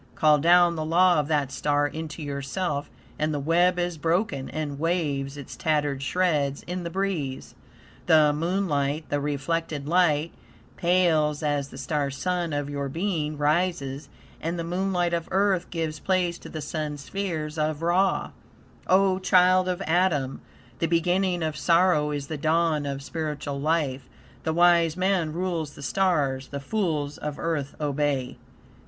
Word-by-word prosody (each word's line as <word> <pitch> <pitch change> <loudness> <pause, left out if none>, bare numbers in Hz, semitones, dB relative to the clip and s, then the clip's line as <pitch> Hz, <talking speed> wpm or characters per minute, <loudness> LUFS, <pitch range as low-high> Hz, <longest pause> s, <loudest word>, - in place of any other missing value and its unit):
Call 150 -1 +4
down 175 +2 +5
the 155 - -2
law 175 +1 +4
of 145 - -1
that 145 -4 0
star 145 +2 +1
into 155 +1 -5
yourself, 145 +2 -3 0.3
and 155 +1 +1
the 145 - -1
web 175 +5 +3
is 175 -2 -2
broken 165 -4 0
and 145 -3 -4
waves 145 -5 -1
its 140 - -8
tattered 145 -3 0
shreds 145 -3 0
in 180 +1 -4
the 170 - -3
breeze. 170 -8 -3 0.5
The 155 -2 +5
moonlight, 155 -3 -1
the 145 - 0
reflected 145 +1 -2
light, 165 -2 +2 0.4
pales 165 -4 +2
as 145 -2 0
the - - -11
Star 140 +1 -1
Sun 175 +4 -2
of 145 -1 -2
your 140 -1 -3
being 160 -2 -2
rises, 145 -3 0 0.3
and 165 +2 -2
the 170 - -2
moonlight 180 0 0
of 170 -1 -1
Earth 190 -2 +1
gives 160 -2 -3
place 180 -2 0
to - - -11
the 155 - -6
Sun 150 0 -4
spheres 160 -1 -4
of 155 +1 -1
Ra. 185 +3 +1 0.6
O 190 0 +4
child 185 0 +4
of 180 +1 -2
Adam! 160 -7 +1 0.4
The 165 - +1
beginning 175 +1 +1
of 155 -1 -2
sorrow 165 -1 +3
is 145 -1 -3
the 155 +2 -5
dawn 155 -1 +1
of 140 0 -4
spiritual 150 -2 -4
life. 145 -4 -1 0.4
The 160 - 0
wise 170 -1 +4
man 185 -4 +1
rules 165 -3 -3
the - - -10
stars; 145 -7 +1
the 140 - -5
fools 150 -4 -2
of 150 -1 -4
Earth 150 -5 -2
obey. 145 -3 -1
155 Hz, 155 wpm, -26 LUFS, 145-175 Hz, 0.6 s, down